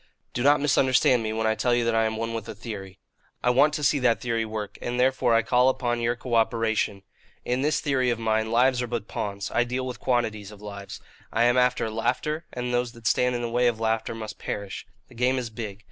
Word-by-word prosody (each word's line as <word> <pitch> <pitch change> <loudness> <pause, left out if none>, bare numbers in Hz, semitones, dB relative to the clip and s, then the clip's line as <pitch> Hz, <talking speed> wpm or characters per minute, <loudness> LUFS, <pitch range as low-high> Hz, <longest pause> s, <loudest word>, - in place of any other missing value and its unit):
"Do 120 - -2
not 145 +3 +5
misunderstand 130 -3 +3
me, 110 -1 -2
when 110 0 -1
I 110 - +3
tell 120 +2 +1
you 120 -1 +1
that 115 - +1
I 115 0 +3
am 110 0 -2
one 115 +1 -3
with 115 -2 -5
a - - -6
theory. 100 -4 -8 0.5
I 125 - +4
want 140 +5 +5
to 150 - -3
see 145 0 +3
that 125 -3 +2
theory 115 -2 -1
work, 110 -2 -6
and 120 +1 -3
therefore 130 -2 +3
I 115 - +3
call 125 +3 +4
upon 120 -2 -1
your 120 +1 +1
cooperation. 115 -4 0 0.4
In 125 +1 0
this 150 +2 +1
theory 130 -4 +1
of 120 - 0
mine, 110 -1 0
lives 125 +2 +3
are 125 - -2
but 115 -3 -4
pawns; 100 -1 -4
I 120 - +3
deal 125 +2 -3
with 125 -1 -6
quantities 110 -5 -1
of 105 -1 -12
lives. 100 -1 -8 0.3
I 115 - +2
am 120 +1 +4
after 125 -2 +2
laughter, 150 +8 -1
and 125 0 -3
those 120 -1 0
that 115 -2 -15
stand 125 +1 +2
in 120 - -2
the 120 - -2
way 120 +1 +3
of 115 -2 0
laughter 115 0 -1
must 110 -1 -7
perish. 100 -1 -5 0.2
The - - -17
game 125 +2 +1
is 120 -3 -3
big. 105 -3 -6
120 Hz, 240 wpm, -26 LUFS, 110-125 Hz, 0.5 s, not